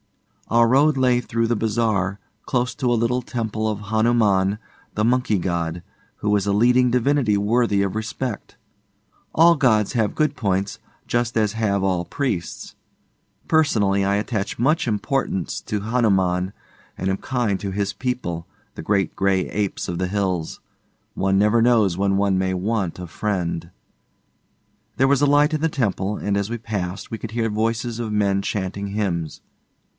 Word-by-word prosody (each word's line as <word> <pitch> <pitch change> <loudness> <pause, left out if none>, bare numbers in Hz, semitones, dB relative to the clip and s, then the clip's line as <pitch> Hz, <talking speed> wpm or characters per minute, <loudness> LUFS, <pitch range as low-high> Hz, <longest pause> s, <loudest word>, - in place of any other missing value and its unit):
Our 115 0 +4
road 140 +4 +4
lay 125 -2 +3
through 115 -1 -1
the 120 - +1
bazaar, 105 -3 0 0.3
close 125 -1 0
to 125 -2 0
a 120 - +2
little 120 +2 +1
temple 110 -3 -2
of 105 -1 -5
Hanuman, 110 -4 +2 0.4
the 105 - +1
Monkey 125 -3 +2
god, 85 -1 -2 0.4
who 105 0 +1
is 100 -2 0
a 100 - +1
leading 125 +4 +4
divinity 125 -3 +2
worthy 105 -1 +2
of 100 +1 -2
respect. 110 +1 -4 0.8
All 170 +1 +6
gods 110 -8 +2
have 110 -4 0
good 150 -2 +1
points, 100 -3 -1 0.3
just 120 -1 0
as 105 -2 +1
have 100 -3 0
all 90 -2 +1
priests. 90 - -4 0.7
Personally, 105 -11 +2
I 100 +1 +1
attach 105 0 -2
much 140 +4 +2
importance 105 - -1
to 105 -1 -3
Hanuman, 95 -5 +1 0.5
and 95 - -3
am 95 0 0
kind 120 -6 -1
to 100 - -3
his 100 0 -2
people 120 -10 -3 0.3
the - - -6
great 95 +1 0
gray 95 -1 +1
apes 100 -2 -2
of 85 -1 -3
the 95 - 0
hills. 95 -4 -2 0.5
One 95 0 +1
never 105 +3 +3
knows 115 -6 +3
when 95 +1 +1
one 100 -1 +2
may 95 0 0
want 95 -2 -2
a 90 - -6
friend. 85 -3 -3 1.3
There 135 - +4
was 140 0 +3
a 145 - +4
light 145 +2 +4
in 155 - -1
the 165 - +2
temple, 105 -7 -1
and 100 -1 -1
as 100 +1 -1
we 120 - -3
passed, 100 -4 -5
we 115 - -4
could 110 - -6
hear 115 0 -1
voices 115 +2 -1
of 115 -2 -3
men 100 -2 +1
chanting 100 0 -3
hymns. 95 -6 -3
105 Hz, 165 wpm, -22 LUFS, 95-120 Hz, 1.3 s, All